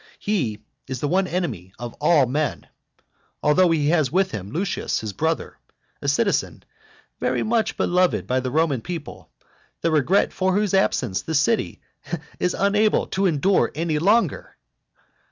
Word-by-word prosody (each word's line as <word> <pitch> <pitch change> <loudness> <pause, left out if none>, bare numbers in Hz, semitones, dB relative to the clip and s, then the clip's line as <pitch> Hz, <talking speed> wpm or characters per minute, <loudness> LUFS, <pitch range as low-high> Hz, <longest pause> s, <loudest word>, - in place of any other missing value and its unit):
He 125 - -2 0.2
is 130 -2 -4
the 145 - -1
one 185 +4 +1
enemy 125 - -3
of 120 0 -6
all 150 -2 +5
men. 140 +2 -2 0.8
Although 175 +5 +4
he 150 -3 +2
has 155 -6 +2
with 190 +3 +2
him 100 -2 -6
Lucius 180 - -2
his 110 -2 -5
brother, 160 - -2 0.4
a - - -4
citizen - - 0 0.6
very - - 0
much 225 -1 0
beloved 180 0 +1
by 130 +1 0
the 130 0 -3
Roman 145 -3 +1
people, 165 +3 -7 0.5
the 165 - +1
regret 160 +6 +2
for 185 0 +1
whose 205 -2 +1
absence 125 - +1
the 160 - -4
city 185 +11 +1 0.6
is 180 - 0
unable 210 +2 +2
to 195 0 +2
endure 180 +4 +2
any 160 -1 -1
longer! 210 +8 +1
160 Hz, 150 wpm, -23 LUFS, 135-190 Hz, 0.8 s, all